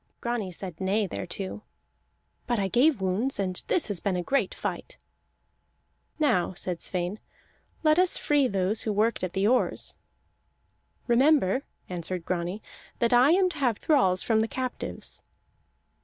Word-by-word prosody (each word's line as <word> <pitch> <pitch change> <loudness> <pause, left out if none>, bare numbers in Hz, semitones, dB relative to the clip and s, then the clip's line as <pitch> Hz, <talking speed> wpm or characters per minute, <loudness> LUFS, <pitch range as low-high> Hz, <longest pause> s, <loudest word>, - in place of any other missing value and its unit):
Grani 235 -6 -2
said 180 0 -8
nay 200 +3 +1
thereto. 190 +2 -5 0.9
"But 240 -1 +1
I 195 -2 0
gave 250 - +3
wounds, 195 +8 0
and 185 -2 -3
this 345 - +1
has 205 -5 -1
been 195 0 -1
a 180 - -1
great 275 +9 +1
fight." - - -5 1.2
"Now," 205 - +1
said 175 -2 -3
Sweyn, 180 +3 -3 0.6
"let 310 +1 +4
us 365 -1 +3
free 290 -3 +2
those 195 0 +1
who 220 - -1
worked 215 0 +1
at 185 -1 -2
the 195 +1 +1
oars." 250 +4 +1 1.1
"Remember," 260 -2 +3 0.2
answered 180 0 -4
Grani, 180 +3 -3 0.3
"that 235 0 +1
I 250 +3 +6
am 375 +1 +4
to 340 - -6
have 245 -6 +1
thralls 190 - +2
from 225 -2 +2
the 220 - +1
captives." 255 +1 -5
210 Hz, 145 wpm, -27 LUFS, 185-255 Hz, 1.2 s, I